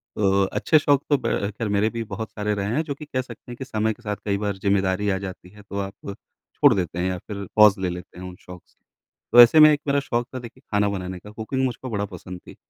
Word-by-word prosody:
तो 100 -1 +2
अच्छे 155 +10 +2
शौक 145 -2 +2
तो 145 - +4
ब 100 -5 -1
ख़ैर 115 - -2
मेरे 105 +2 +2
भी 115 0 -4
बहुत 110 +1 -6
सारे 105 0 -2
रहे 100 0 -2
हैं, 155 - +2
जो 145 -3 -5
कि 150 - -10
कह 130 -3 -2
सकते 125 -1 -12
हैं - - -6
कि 130 - -6
समय 110 -2 -1
के 120 - -22
साथ 105 -1 -2
कई 100 -1 0
बार 100 -1 -3
ज़िम्मेदारी 100 0 +1
आ 95 - +1
जाती 95 -2 -8
है, 105 +1 -16
तो 100 0 -6
आप 95 0 -4 0.6
छोड़ 145 -4 +5
देते 90 -3 -2
हैं 90 - 0
या 90 - -2
फिर 100 -1 -5
पॉज़ 105 -2 +6
ले 95 -1 -1
लेते 90 0 -8
हैं 90 - -7
उन 90 - -9
शौक 90 -1 -12
से। - - -34 0.5
तो 120 - +10
ऐसे 120 +7 +7
में 155 0 +9
एक 150 - +1
मेरा 140 0 +2
शौक 120 -3 -2
था, - - -3
देखिए, 120 +1 -12
खाना 105 -1 +2
बनाने 95 -2 -5
का। 105 - -13
कुकिंग 115 +5 -3
मुझको 130 +1 -4
बड़ा 105 -3 -2
पसंद 90 -1 -9
थी। - - -11
105 Hz, 270 wpm, -23 LUFS, 95-120 Hz, 0.6 s, तो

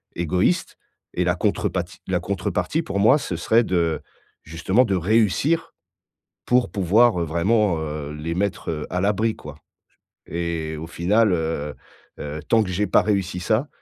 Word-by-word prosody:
égoïste 90 +1 0 0.4
et - - +1
la - - +2
contrepati - - -1
la - - +1
contrepartie - - -2
pour 100 - -3
moi, 120 +8 +6
ce 90 - -4
serait 115 +7 +3
de, 85 -5 0 0.4
justement 95 +10 +1
de 100 - -1
réussir 110 - +1 0.7
pour 125 0 +2
pouvoir, 100 +1 +3
heu, - - +1
vraiment, 90 +3 +1
heu, 75 -1 -5
les 80 +2 -4
mettre, 100 -2 -2
heu, 75 -2 -4
à 90 - -1
l'abri, 105 +2 +1
quoi - - -10 0.7
et 85 -2 -3
au 80 - -6
final, 100 +5 +2
heu 80 -3 -2 0.4
heu, 75 +1 -5
tant 115 -1 +4
que 90 - -4
j'ai 100 +3 0
pas - - +4
réussi 100 -3 -1
ça, 110 - 0
90 Hz, 155 wpm, -23 LUFS, 80-110 Hz, 0.7 s, moi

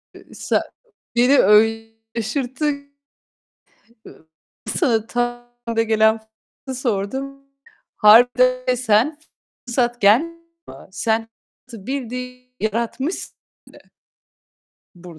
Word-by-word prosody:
Iıı, - - -16
sa - - 0 0.5
beni 255 +4 +4
öyle 225 +2 +4 0.3
şaşırttın. 280 +5 -3 1.8
Sana 225 - +1
tam 240 0 -3 0.2
da 225 - +3
gelen 220 0 +3 0.5
soruyu 260 - -4
sordum. 265 +4 -3 0.5
Harbiden 250 +3 +5
de 255 - +2
sen 245 +5 +1 0.5
fırsat 240 0 -1
gel 210 +8 +5 0.7
sen 225 +3 -1 0.4
fırsatı 225 -6 -12
bildiğin 250 -1 -6
yaratmışsın 235 - -3 0.4
de. - - -15 1.2
Burd 175 -2 -13
240 Hz, 85 wpm, -20 LUFS, 220-255 Hz, 1.8 s, Harbiden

